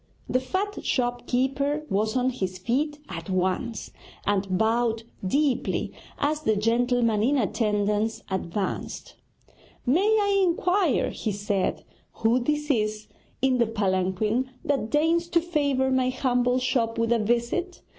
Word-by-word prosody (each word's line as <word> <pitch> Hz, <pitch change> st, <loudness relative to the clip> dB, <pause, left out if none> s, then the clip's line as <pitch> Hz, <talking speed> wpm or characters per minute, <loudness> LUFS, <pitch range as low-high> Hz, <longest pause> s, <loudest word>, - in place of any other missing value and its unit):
The 255 Hz, -, +2 dB
fat 380 Hz, +10 st, -3 dB
shop 245 Hz, -1 st, -1 dB
keeper 275 Hz, +4 st, 0 dB
was 215 Hz, +2 st, 0 dB
on 255 Hz, +1 st, +2 dB
his 190 Hz, -7 st, -3 dB
feet 275 Hz, +10 st, -1 dB
at 165 Hz, -2 st, -7 dB
once, 185 Hz, +5 st, -1 dB, 0.3 s
and 195 Hz, -2 st, +1 dB
bowed 225 Hz, +1 st, +1 dB, 0.2 s
deeply 265 Hz, +6 st, 0 dB, 0.2 s
as 300 Hz, +1 st, 0 dB
the 220 Hz, -7 st, +2 dB
gentleman 230 Hz, 0 st, +2 dB
in 275 Hz, +6 st, +3 dB
attendance 210 Hz, -1 st, 0 dB
advanced. 190 Hz, +1 st, -3 dB, 0.7 s
'May 275 Hz, +9 st, +3 dB
I 405 Hz, -2 st, +3 dB
inquire,' 360 Hz, -2 st, +2 dB
he 220 Hz, -, -3 dB
said, 200 Hz, -1 st, -1 dB, 0.3 s
'who 230 Hz, +3 st, +2 dB
this 300 Hz, +4 st, 0 dB
is 215 Hz, -3 st, -1 dB, 0.3 s
in 260 Hz, -2 st, +3 dB
the 235 Hz, -, +3 dB
palanquin 210 Hz, +3 st, 0 dB, 0.2 s
that 275 Hz, -6 st, 0 dB
deigns 325 Hz, +4 st, +2 dB
to 340 Hz, -, +3 dB
favour 285 Hz, -6 st, 0 dB
my 260 Hz, -1 st, +2 dB
humble 250 Hz, -1 st, +1 dB
shop 240 Hz, -3 st, 0 dB
with 230 Hz, 0 st, +1 dB
a 235 Hz, -, +2 dB
visit? 240 Hz, -, -1 dB
245 Hz, 135 wpm, -26 LUFS, 215-285 Hz, 0.7 s, in